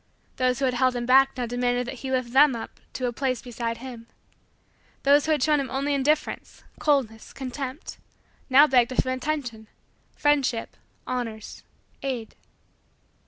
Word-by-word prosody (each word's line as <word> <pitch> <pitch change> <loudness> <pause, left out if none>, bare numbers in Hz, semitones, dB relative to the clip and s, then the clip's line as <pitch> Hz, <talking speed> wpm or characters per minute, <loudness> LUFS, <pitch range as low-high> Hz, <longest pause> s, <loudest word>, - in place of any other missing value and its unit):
Those 255 -1 +1
who 275 - 0
had 255 - +1
held 255 0 +2
him 240 0 -2
back 265 +2 +5
now 250 - -1
demanded 245 +1 0
that 250 0 -7
he 265 - -5
lift 255 -2 -1
them 275 -1 +6
up 225 - -8
to 255 - -3
a 240 - -1
place 255 0 -1
beside 235 -1 -4
him. 235 -2 -9 1.0
Those 285 +2 +4
who - - +2
had 295 -4 +2
shown 300 0 +3
him 275 - -3
only 280 +2 -1
indifference 290 +2 -1 0.2
coldness 255 -7 0
contempt, 265 +2 -6 0.5
now 275 +3 +8
begged 250 -4 +3
of 255 - -5
him 255 - -1
attention 255 -5 -4 0.5
friendship 275 -6 +1 0.3
honors 230 -4 -5 0.4
aid. 250 -5 -4
255 Hz, 160 wpm, -25 LUFS, 245-275 Hz, 1.0 s, now